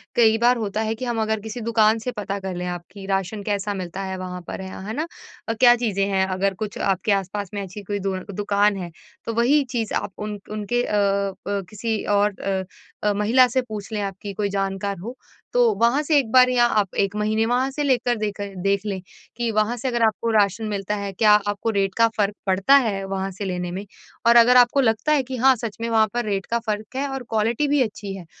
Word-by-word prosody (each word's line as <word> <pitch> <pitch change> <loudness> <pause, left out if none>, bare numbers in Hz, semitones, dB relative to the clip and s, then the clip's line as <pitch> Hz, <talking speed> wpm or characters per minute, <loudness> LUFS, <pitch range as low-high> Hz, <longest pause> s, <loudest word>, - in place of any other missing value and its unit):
कई 225 -2 +5
बार 240 +2 +3
होता 215 -1 -2
है 220 0 -1
कि 255 - -5
हम 235 -2 -1
अगर 220 0 0
किसी 220 +3 -7
दुकान 220 -1 +3
से 250 +3 -3
पता 205 -3 -4
कर 190 -1 -5
लें 180 0 -4
आप 175 -1 -4
कि 195 0 -10
राशन 195 +1 -2
कैसा 205 0 -1
मिलता 185 -1 -5
है 190 0 -4
वहाँ 180 -1 -6
पर? - - -5
हाँ, 190 0 -8
है 220 - -3
ना? 310 +4 -2 0.4
अ, - - +2
क्या 245 -1 +7
चीज़ें 210 -5 0
हैं, 190 -1 +1
अगर 190 +1 0
कुछ 210 - -5
आपके 195 +2 0
आस-पास 200 0 -1
में 205 - -3
अच्छी 195 +2 -8
कोई 205 +1 -3
दुअ 190 -1 -2 0.2
दुकान 205 0 +2
है, 175 -2 -6 0.3
तो 230 - -3
वही 255 +6 +3
चीज़ 230 -4 -2
आप - - -2
उन 210 -1 -5
उनके 215 +3 -1
अ, - - -4
अ, 200 -1 +1 0.3
किसी 220 +1 -3
और 205 -1 +1
अ 190 -1 -1 0.4
अ, 210 -1 +2
महिला 220 +6 +4
से 255 +2 0
पूछ 215 -4 -8
लें 210 - -1
आपकी 200 0 -5
कोई 205 +1 -1
जानकार 195 0 -2
हो। 230 +8 -7 0.4
तो - - +4 0.2
वहाँ 240 +5 +4
से 300 0 +3
एक 235 -5 -3
बार 255 0 +7
या 245 -1 +4
आप 200 -3 -2
1 200 0 +1
महीने 215 +1 +1
वहाँ 250 +3 +1
से 295 +2 -2
लेकर 245 -3 +2
देकर 205 -2 -4
देख 195 +1 +1
लें। 195 -2 -2 0.4
कि 240 -1 -1
वहाँ 215 +2 +1
से 245 - -3
अगर 240 -2 0
आपको 220 +1 0
राशन 205 0 +2
मिलता 205 0 -2
है 200 -1 -4
क्या 210 +2 +5
अ, 210 - +3
आपको 205 +2 -2
रेट 195 -3 0
का 230 0 +6
फ़र्क 205 -1 +1
पड़ता 195 +8 +4
है, 215 -8 +2
वहाँ 195 0 -3
से 195 +2 -6
लेने 180 -2 -3
में। 190 +3 -5 0.4
और 235 - +6
अगर 240 +1 +7
आपको 245 +3 +5
लगता 225 +4 +1
है 295 -3 +3
कि 260 0 -6
हाँ 260 +2 +5
सच 225 -3 -6
में 230 - -2
वहाँ 220 -1 +4
पर 240 -1 -1
रेट 195 -2 -2
का 235 - -1
फ़र्क 215 +3 -3
है 275 +2 -1
और 270 -1 -4
क्वालिटी 225 +6 +1
भी 285 -1 +2
अच्छी 210 -4 -3
है, 185 -3 -9
210 Hz, 240 wpm, -23 LUFS, 195-235 Hz, 0.4 s, क्या